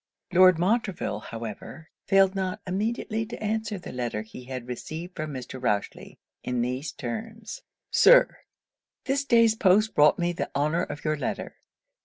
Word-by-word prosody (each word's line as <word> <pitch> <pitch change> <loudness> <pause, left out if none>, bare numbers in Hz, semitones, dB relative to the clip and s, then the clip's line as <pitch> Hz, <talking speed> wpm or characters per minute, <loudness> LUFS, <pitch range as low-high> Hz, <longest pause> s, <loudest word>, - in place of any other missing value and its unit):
Lord 185 -1 +7
Montreville, 195 - 0
however, 115 +8 -8 0.2
failed 195 -1 +4
not 190 -2 -2
immediately 215 +3 -2
to 235 - -8
answer 215 0 -2
the 180 - -9
letter 120 -4 -3
he 115 +3 -12
had 130 -1 -6
received 160 +8 -7
from 155 0 -4
Mr. 130 -1 -7
Rochely, 105 -5 -2 0.3
in 125 -1 -1
these 130 +4 -2
terms 220 - -6 0.3
'Sir, - - +6 0.7
'This 275 +1 0
day's 230 -4 +5
post 215 +1 +3
brought 150 0 +5
me 175 0 0
the - - -3
honour 150 +4 +1
of 145 - -6
your 155 0 +1
letter. - - -4
175 Hz, 150 wpm, -26 LUFS, 130-215 Hz, 0.7 s, Lord